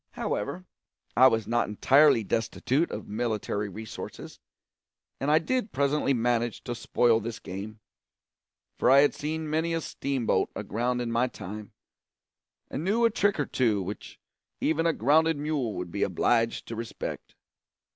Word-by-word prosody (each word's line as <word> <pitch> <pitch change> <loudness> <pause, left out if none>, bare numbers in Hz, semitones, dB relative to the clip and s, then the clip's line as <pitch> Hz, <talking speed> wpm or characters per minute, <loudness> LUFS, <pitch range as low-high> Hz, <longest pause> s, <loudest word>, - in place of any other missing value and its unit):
However, 140 - -3 0.5
I 130 +2 +8
was 115 -4 +1
not 120 +2 +1
entirely 135 +3 +5
destitute 130 - 0
of - - -6
military 105 -2 -2
resources, 110 +3 -8 0.8
and 140 - -1
I 155 - +6
did 240 +6 -1
presently 140 +1 +1
manage 120 -2 0
to 120 - -4
spoil 115 -1 +2
this 115 +1 -5
game; 105 +4 -7 1.0
for - - +3
I 135 +1 +8
had 145 - +3
seen 155 +1 -4
many 160 +2 0
a 165 - -1
steam 135 -5 -3
boat - - +2
aground 125 +3 -1
in 115 - -3
my 120 +2 +2
time, 105 -2 -8 0.9
and 150 - -4
knew 220 +6 +2
a 230 - +4
trick 205 -4 +1
or 145 - +1
two 110 -6 +1
which 100 +3 -8 0.4
even 160 +2 +1
a 165 - +2
grounded 160 +6 +3
mule 145 -7 -2
would 90 -1 -5
be - - -4
obliged 115 -1 +1
to 115 - -4
respect. 115 0 -6
125 Hz, 155 wpm, -27 LUFS, 110-150 Hz, 1.0 s, I